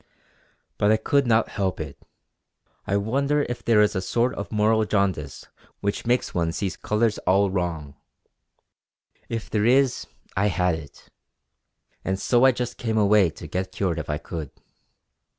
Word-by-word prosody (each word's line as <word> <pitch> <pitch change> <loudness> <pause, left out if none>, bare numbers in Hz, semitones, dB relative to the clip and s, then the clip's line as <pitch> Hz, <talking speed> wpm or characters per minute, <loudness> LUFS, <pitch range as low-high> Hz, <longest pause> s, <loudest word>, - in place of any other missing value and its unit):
But 105 - +4
I 110 - +4
could 140 +4 +1
not 115 -1 +3
help 95 -3 -2
it. 75 -3 -6 0.9
I 100 - +1
wonder 140 +8 +1
if 120 - -5
there 115 -2 +4
is 105 - +1
a 95 - 0
sort 120 +6 0
of 100 - -6
moral 110 +1 +3
jaundice 95 -10 -1 0.3
which 100 +3 -3
makes 125 0 +1
one 85 -2 0
see 95 +1 -2
colours 110 0 0
all 95 +1 +2
wrong! 80 -6 -3 1.3
If 115 -1 -4
there 105 -1 +1
is, 130 +1 +3 0.3
I 100 +2 +2
had 90 -3 +1
it; 80 -3 -9 1.0
and 95 0 -2
so 120 +5 +3
I 135 - +7
just 125 -1 -4
came 110 -2 -1
away 105 -3 +4
to - - -11
get 95 0 -3
cured 90 -4 -1
if 80 - -6
I 75 - 0
could. 80 -2 -6
100 Hz, 160 wpm, -24 LUFS, 90-115 Hz, 1.3 s, I